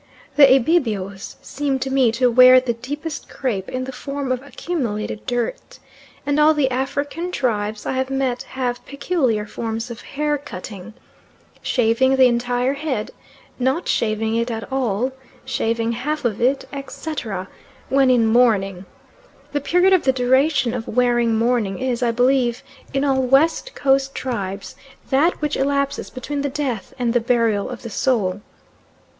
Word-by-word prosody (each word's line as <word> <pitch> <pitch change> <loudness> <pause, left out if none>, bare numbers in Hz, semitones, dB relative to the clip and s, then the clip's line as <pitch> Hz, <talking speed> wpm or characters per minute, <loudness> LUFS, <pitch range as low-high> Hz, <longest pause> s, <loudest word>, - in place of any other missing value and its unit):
The 280 -2 +7
Ibibios 220 - 0
seem 280 -1 -2
to 265 0 -3
me 265 -4 +3
to 250 +1 +2
wear 255 +1 +8
the 255 -2 -2
deepest 290 +7 -6
crape 210 -8 -3
in 255 0 -3
the 260 - -5
form 275 +1 -4
of 255 -1 -1
accumulated 250 -9 -4
dirt, 245 - -3 0.5
and 285 +1 +1
all 310 +1 +5
the 270 -3 +1
African 285 +7 -2
tribes 215 -7 -2
I - - -1
have 260 0 -1
met 265 -2 -1 0.2
have 245 -2 -2
peculiar 280 -8 0
forms 225 +2 -4
of 235 - -8
hair 295 0 -2
cutting 200 -3 -9 0.7
shaving 250 +2 +2
the 260 -1 +6
entire 245 +1 +1
head, 275 -7 -3 0.5
not 265 +8 0
shaving 220 0 0
it 235 +1 0
at 225 +2 -5
all, 255 -2 0 0.3
shaving 230 0 -1
half 275 +5 -3
of 220 -3 -1
it, 265 +3 +2
etc. 275 -8 -5 0.4
when 270 -1 +4
in 245 -3 +4
mourning. 210 -5 +2 0.7
The 290 0 -1
period 360 +6 +3
of 370 - +5
the 265 - +4
duration 260 0 +2
of 240 -3 -4
wearing 240 -1 +2
mourning 225 -4 +1
is, 255 -1 -2
I 240 - +2
believe, 245 0 +2 0.3
in 275 +1 0
all 265 -1 +2
West 285 - +2
Coast 270 0 +1
tribes 200 -6 -4 0.4
that 295 +6 +3
which 300 -1 0
elapses 280 0 -1
between 280 +2 -4
the 285 - -1
death 260 -7 -3
and 240 -2 0
the 240 - +4
burial 230 -4 +1
of 250 -2 -8
the 230 - -7
soul. 205 -6 0
255 Hz, 155 wpm, -21 LUFS, 230-275 Hz, 0.7 s, wear